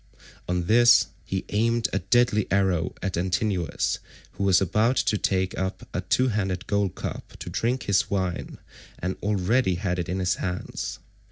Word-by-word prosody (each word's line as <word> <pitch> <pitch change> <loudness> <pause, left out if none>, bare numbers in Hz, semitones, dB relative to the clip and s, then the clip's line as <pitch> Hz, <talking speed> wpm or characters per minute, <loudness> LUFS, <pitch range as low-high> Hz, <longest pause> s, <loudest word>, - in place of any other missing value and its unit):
On 90 -1 -1
this 120 +4 +6
he 95 -1 -3
aimed 115 +1 +1
a - - +2
deadly 120 -4 +2
arrow 95 -3 +1
at 95 -1 -1
Antinous, 90 0 0 0.3
who - - -5
was 95 -2 +5
about 105 +7 +2
to 115 - +1
take 95 -2 0
up 95 0 -3
a 90 - -1
two 130 +8 +2
handled 95 -4 -1
gold 100 -2 0
cup - - -6
to - - -7
drink 125 +3 0
his 100 0 +1
wine 95 -3 -2 0.4
and 90 +2 -3
already 105 +1 +1
had 90 0 -2
it 85 - -3
in 90 - -1
his 90 -1 0
hands. 90 -1 -4
95 Hz, 165 wpm, -25 LUFS, 90-110 Hz, 0.4 s, this